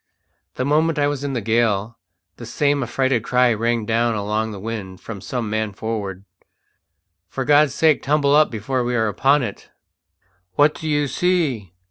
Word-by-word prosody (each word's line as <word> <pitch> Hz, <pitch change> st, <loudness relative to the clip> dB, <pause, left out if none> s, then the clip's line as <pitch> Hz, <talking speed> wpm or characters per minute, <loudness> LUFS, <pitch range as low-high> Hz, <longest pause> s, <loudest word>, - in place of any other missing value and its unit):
The 130 Hz, -, -2 dB
moment 155 Hz, +3 st, +2 dB
I 145 Hz, -, +2 dB
was 145 Hz, -1 st, -2 dB
in 140 Hz, -1 st, -3 dB
the 120 Hz, -, -2 dB
gale 110 Hz, 0 st, 0 dB, 0.4 s
the -, -, -9 dB
same 145 Hz, -1 st, +1 dB
affrighted 130 Hz, -3 st, 0 dB
cry 125 Hz, -1 st, +3 dB
rang 115 Hz, 0 st, -1 dB
down 115 Hz, +1 st, +1 dB
along 105 Hz, +2 st, -1 dB
the 105 Hz, -2 st, -7 dB
wind 100 Hz, -3 st, -6 dB
from 105 Hz, -4 st, -8 dB
some 115 Hz, +4 st, -4 dB
man 110 Hz, -1 st, -2 dB
forward: 100 Hz, -3 st, -5 dB, 1.0 s
"For 135 Hz, -, -4 dB
God's 145 Hz, -1 st, +4 dB
sake 155 Hz, -5 st, +3 dB
tumble 145 Hz, 0 st, +2 dB
up 155 Hz, 0 st, +5 dB
before 125 Hz, +4 st, -2 dB
we 120 Hz, 0 st, -1 dB
are 110 Hz, -2 st, +1 dB
upon 135 Hz, +7 st, +2 dB
it!" 105 Hz, -4 st, -7 dB, 0.9 s
"What 145 Hz, +1 st, +4 dB
do 160 Hz, -, -7 dB
you 145 Hz, -1 st, +1 dB
see?" 135 Hz, -, -1 dB
120 Hz, 170 wpm, -21 LUFS, 110-145 Hz, 1.0 s, up